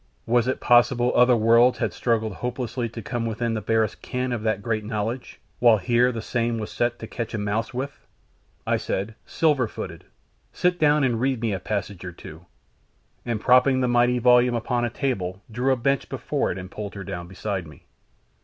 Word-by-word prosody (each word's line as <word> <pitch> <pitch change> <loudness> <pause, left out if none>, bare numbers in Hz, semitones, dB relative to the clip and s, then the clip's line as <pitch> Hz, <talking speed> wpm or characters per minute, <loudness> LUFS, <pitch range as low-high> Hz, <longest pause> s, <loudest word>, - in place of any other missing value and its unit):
"Was 120 +1 +2
it 130 - -1
possible 120 0 +4
other 125 0 +6
worlds 115 +3 +5
had - - -1
struggled 110 -3 0
hopelessly 125 +1 -3
to 115 0 -8
come 120 +1 -3
within 115 +1 -2
the 110 - -2
barest 110 0 0
ken 125 -1 -3
of 120 -3 -2
that 110 -2 -1
great 110 -2 -1
knowledge, 110 +3 -4 0.2
while 120 -3 +6
here 120 +6 +2
the 115 -2 -5
same 120 -1 -1
was 110 -1 -5
set 120 0 0
to - - -7
catch 115 0 -5
a - - -1
mouse 105 +2 -2
with?" 135 +2 -5 0.6
I - - +2
said, 100 +4 -3
"Silver 145 -7 +2
footed, - - -8 0.5
sit 180 0 0
down 150 -1 +4
and 120 -3 +1
read 130 -2 +1
me 115 -2 -1
a 95 - -2
passage 100 -2 -4
or 90 -1 -6
two," 85 0 -12 0.8
and 115 -2 -1
propping 130 +3 +4
the 125 - +2
mighty 120 0 +3
volume 125 0 +4
upon 120 +1 0
a - - -1
table 100 -7 -3
drew 125 +4 +1
a - - +4
bench 135 +2 0
before - - -1
it 90 - -5
and 90 0 -8
pulled 105 -1 -6
her 100 - -6
down 85 -1 -6
beside 95 -1 -4
me. 75 - -16
115 Hz, 200 wpm, -24 LUFS, 110-125 Hz, 0.8 s, other